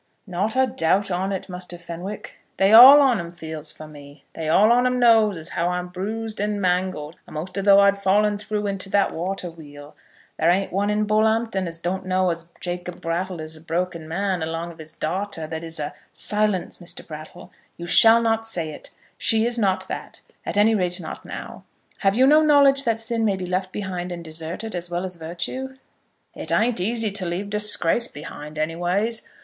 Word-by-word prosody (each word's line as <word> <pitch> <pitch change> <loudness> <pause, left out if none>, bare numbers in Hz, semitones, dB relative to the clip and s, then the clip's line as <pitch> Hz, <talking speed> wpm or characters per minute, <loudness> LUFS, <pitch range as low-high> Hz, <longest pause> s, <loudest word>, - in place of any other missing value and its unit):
"Not 200 +4 -2
a 260 0 +4
doubt 195 -3 +1
on 185 +2 -1
it, 190 - -4
Muster 180 -1 -6
Fenwick. 175 +4 -8 0.2
They 195 +2 +4
all 265 +6 +11
on 255 -6 +3
'em 170 0 -5
feels 160 -3 -6
for 155 - -11
me. 145 -1 -14
They 160 -1 -4
all 210 +7 +5
on 245 +1 +4
'em 250 0 0
knows 225 -5 +4
as 160 0 -7
how 170 - -1
I'm 180 0 -2
bruised 215 +4 -4
and 205 0 -1
mangled 180 -4 -1
a'most 165 +5 -7
as 195 -1 -2
though 200 -1 +7
I'd 200 0 +3
fallen 205 +1 +2
through 210 0 -3
into 195 -1 -2
that 200 0 +2
water 180 +1 -4
wheel. 145 -2 -13 0.4
There 165 - +3
ain't 190 +2 +1
one 200 +2 0
in 210 0 +1
all - - +1 0.2
Bull'ompton 220 -4 0
as 165 0 -6
don't 175 +3 -3
know 185 -1 +2
as 170 0 -6
Jacob 175 0 -5
Brattle 175 +2 -3
is 155 0 -6
a 155 - -12
broken 170 0 -3
man 185 +2 -1
along 165 +1 -4
of 165 - -16
his 155 0 -8
da'ter 180 +1 -3
that 160 +1 -6
is 165 -1 -5
a 145 0 -4 0.2
" - - -44
"Silence, 210 -3 0
Mr. 175 - -3
Brattle. 155 -1 -10 0.3
You 170 - -7
shall 225 +6 +6
not 225 0 0
say 170 -8 -1
it. - - -10 0.3
She 225 0 +2
is 240 0 0
not 195 -3 0
that; - - -7 0.3
at - - -2
any 215 +2 +5
rate 180 -4 -1
not - - -8
now. - - -8 0.4
Have 195 -1 +2
you 255 +3 +5
no 300 +3 +6
knowledge 280 -2 +5
that 230 -1 +1
sin 225 0 -1
may 205 -3 +2
be 185 -1 -5
left 185 +1 -2
behind 185 -3 -4
and 170 -1 -6
deserted 165 +7 -4
as 175 -1 -4
well 175 +1 -2
as 185 -1 -5
virtue?" 175 +12 -5 0.6
"It - - -6
ain't 230 -2 +2
easy 220 +3 -1
to 195 -2 -2
leave 190 +4 -4
disgrace 210 +1 +2
behind, 150 0 -9
any 155 +2 -1
ways. 200 +7 -1
185 Hz, 205 wpm, -23 LUFS, 170-215 Hz, 0.6 s, all